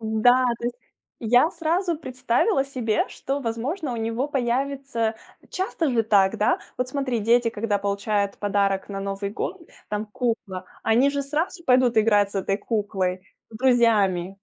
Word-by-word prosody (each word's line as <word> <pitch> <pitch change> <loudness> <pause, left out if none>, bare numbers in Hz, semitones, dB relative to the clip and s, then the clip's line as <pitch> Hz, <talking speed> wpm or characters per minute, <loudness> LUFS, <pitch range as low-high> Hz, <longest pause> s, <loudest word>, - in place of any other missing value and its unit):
Да! 225 +3 +3
То - - -8
есть 245 0 -3 0.4
я 245 +7 +4
сразу 340 +1 0
представила 260 - 0
себе, 245 -6 -1
что, 275 +1 -4
возможно, 255 +6 -3
у - - -4
него 230 +4 -1
появится 265 -3 -1 0.4
часто 375 -5 -1
же 230 -2 +2
так, 200 -3 +3
да? 210 - +2 0.2
Вот 250 0 -2
смотри, 255 -4 -1
дети, 235 +2 +3 0.3
получают 200 0 -1
подарок 200 -1 0
на 195 -1 -5
Новый 195 0 -3
год, 355 - -4 0.3
там 210 +1 -3
кукла, 210 -5 -3 0.2
они 245 +5 +3
же 280 0 -2
сразу 320 +5 -2
пойдут 250 -3 +3
играть 205 -2 +4
с - - -17
этой 195 0 0
куклой 190 -4 -2 0.3
с 220 - -9
друзьями. 215 -8 +3
230 Hz, 150 wpm, -24 LUFS, 205-270 Hz, 0.4 s, я